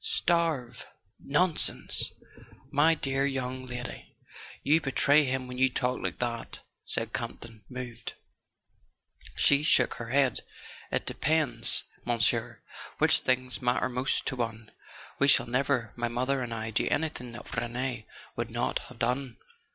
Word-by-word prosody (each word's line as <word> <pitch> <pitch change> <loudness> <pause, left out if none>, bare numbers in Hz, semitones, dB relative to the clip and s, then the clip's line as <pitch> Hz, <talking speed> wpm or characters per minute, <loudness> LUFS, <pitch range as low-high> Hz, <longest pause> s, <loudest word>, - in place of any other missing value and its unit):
"Starve—nonsense! 165 - 0 0.6
My 160 +3 +4
dear 135 -2 -1
young 130 -2 -3
lady, 125 0 -8 0.5
you 155 +3 +4
be¬ 135 - -3
tray 145 +1 +5
him 130 0 -2
when 125 0 -7
you 130 0 +4
talk 125 0 -2
like - - -4
that," 120 -1 -4 0.2
said - - -3
Campton, 115 -3 -6
moved. 125 -2 -7 1.2
She 140 0 +5
shook 130 -4 +4
her 115 - -6
head. 135 0 +2 0.5
"It - - 0
depends, 140 -6 +4 0.2
Monsieur, 115 -2 +1 0.3
which - - +5
things 130 0 -1
matter 125 +1 +1
most 125 +2 0
to 135 - -2
one. 115 -3 -5 0.5
We 140 - +4
shall 130 -3 +6
never—my 120 -2 -1
mother 130 +3 -1
and 120 -2 -5
I—do 110 -1 -1
anything 135 -6 -2
that 120 - -9
Rene 120 0 -3 0.3
would - - -3
not - - -1
have - - -13
done. 125 -1 -2
125 Hz, 130 wpm, -28 LUFS, 120-140 Hz, 1.2 s, shall